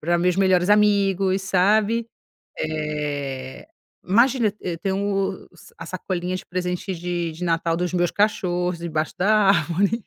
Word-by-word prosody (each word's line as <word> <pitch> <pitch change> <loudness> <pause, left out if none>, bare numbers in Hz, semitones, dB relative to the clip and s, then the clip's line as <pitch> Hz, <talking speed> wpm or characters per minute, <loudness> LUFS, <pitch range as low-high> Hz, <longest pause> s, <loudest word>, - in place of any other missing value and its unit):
pra 175 +2 +1
meus 180 0 +2
melhores 185 -1 +3
amigos, 195 -2 +3
sabe. 210 +4 +2 0.5
Eh, 145 - -4 0.4
imagina, 235 +3 +3
e 180 - -3
eu 165 - -6
tem 190 +2 -2
o 195 -1 -2
sa 170 - -17
a 170 - -8
sacolinha 185 0 -3
de - - -8
presentes 180 0 -3
de 175 -1 -2
de 165 +3 -6
Natal 165 -1 0
dos 180 +1 -2
meus 175 -1 +1
cachorros 180 -4 0
debaixo 160 -2 -3
da 205 +4 +3
árvore. 195 +5 +1
180 Hz, 150 wpm, -23 LUFS, 170-195 Hz, 0.5 s, melhores